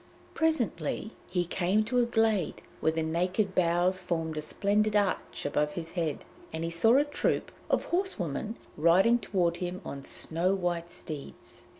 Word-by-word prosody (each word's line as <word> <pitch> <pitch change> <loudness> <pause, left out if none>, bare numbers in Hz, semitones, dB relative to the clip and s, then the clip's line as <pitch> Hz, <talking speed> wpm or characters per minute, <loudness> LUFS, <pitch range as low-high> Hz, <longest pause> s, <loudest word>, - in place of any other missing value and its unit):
Presently 235 - 0 0.2
he 180 -1 0
came 185 +5 +1
to 245 +3 +1
a 240 - +3
glade 225 -6 +1 0.2
where 160 - +2
the 160 0 -1
naked 180 +5 0
boughs 180 +1 +2
formed 165 -3 -2
a 155 - -2
splendid 210 +6 +1
arch 200 -2 0
above 150 +1 0
his 165 -2 -6
head, 165 -5 -2 0.3
and 160 +1 -4
he 165 - -2
saw 225 +9 +5
a 290 - +4
troop 290 - -1 0.2
of - - +2
horsewomen 220 - -2 0.2
riding 185 +10 +5
toward 175 -6 0
him 180 0 -4
on 140 -1 -6
snow 170 +7 0
white 175 -2 -2
steeds. 155 -5 -9
180 Hz, 160 wpm, -29 LUFS, 165-215 Hz, 0.3 s, saw